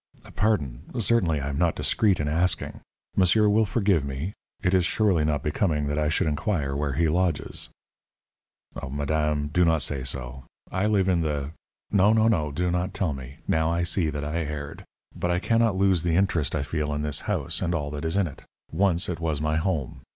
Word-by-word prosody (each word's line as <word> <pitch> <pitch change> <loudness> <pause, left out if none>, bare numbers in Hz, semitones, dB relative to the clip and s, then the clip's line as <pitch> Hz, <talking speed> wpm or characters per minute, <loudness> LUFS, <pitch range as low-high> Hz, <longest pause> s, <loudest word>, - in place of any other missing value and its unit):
"Pardon. 90 - 0 0.2
Certainly 95 -10 +2
I 70 - -3
am 70 +1 -3
not 85 -2 +2
discreet 100 -5 +2
in 75 - -1
asking. 85 +3 0 0.4
Monsieur 95 +3 +4
will 105 +1 +3
forgive 100 - +2
me? 70 +8 -4 0.3
It 90 - +2
is 95 -1 +4
surely 95 -3 +2
not 75 -1 0
becoming 75 -1 0
that 75 +1 -1
I 75 0 +1
should 75 - +1
inquire 75 -2 -1
where 70 -1 -1
he 80 +5 +2
lodges." 85 0 -1 1.2
"Madame, 75 +1 -1
do 90 +4 +2
not 80 -3 +3
say 70 -1 -1
so. 65 0 -5 0.3
I 95 +3 0
live 100 -3 +2
in 90 -3 +2
the 75 -2 -2 0.2
" - - -43
"No, 100 +1 +5
no, 110 0 +4
no; 80 -10 +1
do 90 +4 -1
not 90 +1 -2
tell 90 -6 0
me. 65 0 -10
Now 80 +1 +2
I 85 +1 0
see 85 -1 +1
that 75 -1 -4
I 75 +3 -2
erred. 75 -2 -6 0.3
But 90 - -2
I 85 - +2
cannot 115 +2 +2
lose 95 -3 +3
the 85 -1 0
interest 90 -5 +1
I - - 0
feel 75 0 -2
in 75 - -2
this 75 -2 0
house - - -1
and 85 - 0
all 75 -3 -3
that 75 0 -5
is 80 +3 0
in 100 - +3
it. 75 - -9 0.3
Once 90 0 +2
it 90 -2 -3
was 80 -3 -1
my 75 +1 0
home. 80 -6 -2
80 Hz, 205 wpm, -26 LUFS, 75-95 Hz, 1.2 s, No